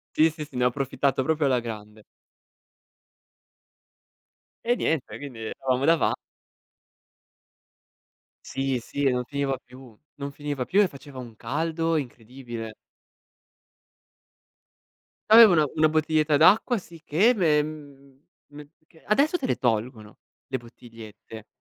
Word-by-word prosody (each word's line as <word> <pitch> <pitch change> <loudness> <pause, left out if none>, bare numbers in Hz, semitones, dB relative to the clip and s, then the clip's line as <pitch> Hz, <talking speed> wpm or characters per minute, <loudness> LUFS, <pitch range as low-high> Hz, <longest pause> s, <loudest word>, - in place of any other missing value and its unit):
Sì, 160 +1 +5
sì, 155 -1 -7
sì, 145 - -17
ne 125 - 0
ho 125 - +5
approfittato 135 0 -1
proprio 155 0 0
alla 130 -2 +2
grande. 105 -2 -9 2.6
E 240 - +2
niente, 160 - -2
quindi 135 -5 -9
eravamo 130 +4 -2
dava 165 0 +3 2.3
Sì, 135 -2 -2
sì, 140 +4 -5
e 135 - +4
non 125 0 -1
finiva 140 0 -2
più. 125 -3 -16 0.2
Non 140 0 -6
finiva 145 -3 -4
più 200 +2 +3
e 200 - +4
faceva 140 -3 -12
un 120 -3 -10
caldo 160 +7 -2
incredibile. 120 -3 -7 2.6
Aveva 220 -2 +9
una 155 -3 +4
una 155 0 +4
bottiglietta 155 -1 +2
d'acqua, 220 - +5
sicché, 170 +4 +1
ve 160 -9 +3
mhmm, 140 -3 -10 0.3
me 150 0 -10
perchè 160 +1 -24
adesso 290 - +3
te 275 - -4
le - - 0
tolgono 110 -2 -2 0.3
le 130 - -1
bottigliette, 115 -2 -13
140 Hz, 120 wpm, -25 LUFS, 125-155 Hz, 2.6 s, Aveva